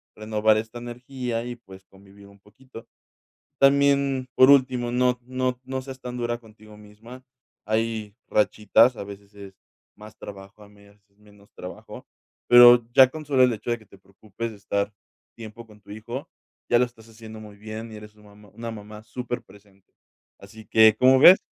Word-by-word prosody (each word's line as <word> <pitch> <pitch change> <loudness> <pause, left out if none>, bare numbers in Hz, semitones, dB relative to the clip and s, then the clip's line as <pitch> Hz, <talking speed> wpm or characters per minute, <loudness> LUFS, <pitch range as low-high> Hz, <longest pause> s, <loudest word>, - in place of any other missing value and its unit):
renovar 110 0 +1
esta 110 +2 -6
energía 120 0 -6
y, 120 0 -7
pues, 95 -4 -16
convivir 100 +1 -19
un 100 0 -20
poquito. 115 +3 -16 0.7
También, 140 -1 +3
por 130 +1 +6
último, 130 -3 +3
no 125 0 +1
no 130 0 -3
no 130 0 -4
seas 130 0 -10
tan 125 -1 -7
dura 120 -1 -3
contigo 110 -2 -18
misma, 110 +5 -14 0.4
hay 110 -1 -2
rachitas, 105 +3 +2
a - - -7
veces 100 0 -12
es 100 -1 -12 0.4
más 105 0 -14
trabajo, 100 +1 -12
a 100 - -18
medias 100 0 -22
es 100 - -38
menos 105 -1 -22
trabajo, 90 - -11 0.4
pero 120 -1 +8
ya 130 -1 +8
con 155 +1 -9
solo 135 -3 +2
el 125 - +2
hecho 115 +2 -6
de 120 - -1
que 110 - -21
te 100 - -19
preocupes 105 +4 -8
de 110 - -12
estar 100 0 -3 0.4
tiempo 115 0 -11
con 105 -1 -18
tu - - -18
hijo, 120 +8 -8 0.4
ya 120 - +5
lo - - +4
estás 115 -2 -18
haciendo 110 -1 -12
muy 105 -1 -13
bien 110 +2 -9
y - - -9
eres 105 0 -12
su 105 0 -23
mamá, 105 0 -18
una 115 +1 -7
mamá 105 0 -11
superpresente. 105 -5 -9 0.5
Así 105 +2 -14
que, 110 0 +5
¿cómo 130 +2 +5
ves? 185 +5 +9
110 Hz, 180 wpm, -24 LUFS, 105-125 Hz, 0.7 s, ves